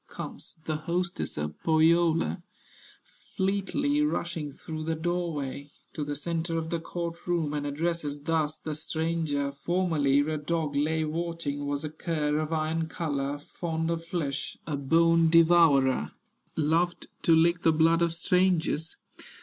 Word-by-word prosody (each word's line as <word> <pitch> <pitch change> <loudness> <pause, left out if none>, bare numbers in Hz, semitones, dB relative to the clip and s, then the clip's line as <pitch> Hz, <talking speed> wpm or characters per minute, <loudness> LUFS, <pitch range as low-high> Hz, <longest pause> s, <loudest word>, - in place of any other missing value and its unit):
Comes - - -8
the 155 -1 -1
hostess 175 +3 -2
of 75 0 -4
Pohyola, 160 - +3 1.0
Fleetly 200 +10 +1
rushing 170 - -1
through 155 +2 -7
the 160 +1 -1
door 175 +1 -1
way, 140 -1 -5 0.2
To 150 - -3
the 145 0 -3
centre 165 +2 -2
of 160 0 -3
the 170 - 0
court 170 +1 -5
room, 165 -4 0
And 145 -1 -2
addresses 150 -1 -2
thus 155 0 0
the 155 - -5
stranger: 155 -2 -1
"Formerly 145 -2 +1
a 155 +1 -1
dog 155 -1 -2
lay 155 +2 +1
watching, 155 -3 -3
Was 145 +1 -2
a 155 - -4
cur 155 -2 -1
of 155 0 -3
iron 160 +1 0
color, 145 -4 -2
Fond 160 +2 -3
of 165 0 -2
flesh, 155 -5 -3
a 150 - -2
bone 165 +4 +4
devourer, 160 -5 +5 0.4
Loved 165 +3 +1 0.2
to 165 - +5
lick 170 +1 +3
the 165 - +4
blood 165 +2 +3
of 170 -1 +3
strangers. 170 -2 +1
160 Hz, 145 wpm, -28 LUFS, 150-170 Hz, 1.0 s, devourer